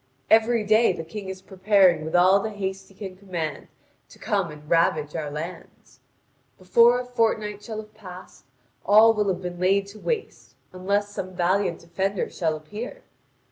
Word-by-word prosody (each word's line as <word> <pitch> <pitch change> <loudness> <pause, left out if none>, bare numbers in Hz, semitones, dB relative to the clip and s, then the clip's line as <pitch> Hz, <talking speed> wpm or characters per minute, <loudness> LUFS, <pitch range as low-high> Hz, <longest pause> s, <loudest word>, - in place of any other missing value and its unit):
Every 225 0 +4
day 215 0 +4
the 165 - -6
King 190 +4 -8
is 190 0 -8
preparing 190 -4 +3
with 160 +2 -4
all 185 +3 +5
the 220 - -3
haste 190 -2 -5
he 195 - -20
can 190 -2 -8
command 180 -5 -5 0.4
to - - -16
come 200 -6 -1
to 150 - -9
ravage 155 -2 +1
our 155 -3 -3
lands. 165 +4 -9 0.6
Before 235 +6 +4
a 250 - -5
fortnight 220 -4 -1
shall 220 -1 -6
have 215 0 -9
passed, 185 -3 -12 0.4
all 220 +2 +6
will 210 -2 0
have 185 -1 -2
been 175 -1 -6
laid 195 +2 +1
waste, 430 - -5 0.2
unless 200 +3 -1
some 185 -2 -7
valiant 180 0 0
defender 190 +3 -2
shall 160 -3 -1
appear. 210 - -8
195 Hz, 165 wpm, -24 LUFS, 180-215 Hz, 0.6 s, all